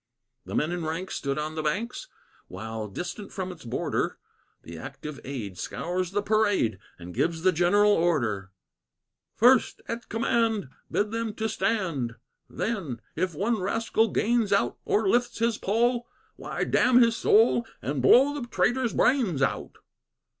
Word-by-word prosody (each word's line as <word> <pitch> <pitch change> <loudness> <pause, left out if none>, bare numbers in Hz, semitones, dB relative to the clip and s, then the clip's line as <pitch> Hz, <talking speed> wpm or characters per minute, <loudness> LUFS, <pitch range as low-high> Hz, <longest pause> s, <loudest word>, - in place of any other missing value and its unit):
The - - -5
men 155 - +1
in 175 -1 -3
ranks 165 +4 -3
stood 140 0 -2
on 155 +1 -3
the 160 - -3
banks, 220 - -2 0.4
While, 110 +3 -6
distant 180 - -6
from 185 -1 -4
its 165 -3 -12
border, 120 - -2 0.5
The 85 - -9
active 140 - -8
aid 110 -9 -6
scours 175 - -3
the 200 +2 -1
parade 205 - +2 0.2
And 90 +1 -9
gives 165 - -1
the 185 - +5
general 190 +5 +4
order: 120 - +1 0.9
"First, 245 +3 +4
at 235 +1 -5
command, 225 - 0 0.2
bid 210 +1 0
them 225 -2 -3
to 220 0 -1
stand; 170 - -1 0.3
Then, 170 - -3 0.2
if 175 0 -1
one 215 +7 0
rascal 225 +3 +1
gains 225 0 +1
out 200 - +1
Or 210 -1 +1
lifts 240 +5 +1
his 230 0 0
poll, 240 +4 +1 0.3
why, - - -4
damn 245 0 +4
his 230 -2 +4
soul 230 +1 +4
And 140 0 -2
blow 265 - +6
the 280 -5 -5
traitor's 245 0 +1
brains 220 - +2
out." - - -2
190 Hz, 150 wpm, -27 LUFS, 150-230 Hz, 0.9 s, blow